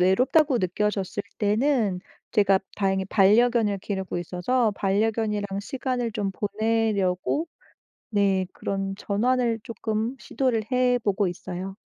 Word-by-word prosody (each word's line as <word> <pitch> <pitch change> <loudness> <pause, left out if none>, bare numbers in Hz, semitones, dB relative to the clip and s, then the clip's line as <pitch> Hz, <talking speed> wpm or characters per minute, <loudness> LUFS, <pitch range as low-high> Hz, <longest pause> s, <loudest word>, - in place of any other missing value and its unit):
외롭다고 255 - +3
느껴졌을 200 +1 -1 0.2
때는 215 -2 +1 0.3
제가 200 -3 +4 0.2
다행히 195 -1 +1
반려견을 215 +1 +4
기르고 190 -2 -4
있어서 200 +8 0
반려견이랑 205 0 0
시간을 250 0 -3
좀 200 -2 -1
보내려고 215 - 0 0.6
네 195 -2 +2
그런 195 0 -3
전환을 235 +3 +1
쪼끔 225 +2 -3
시도를 250 -5 -1
해 250 -1 +3
보고 200 -1 +1
있어요. 185 +2 -6
210 Hz, 275 characters per minute, -25 LUFS, 195-235 Hz, 0.6 s, 제가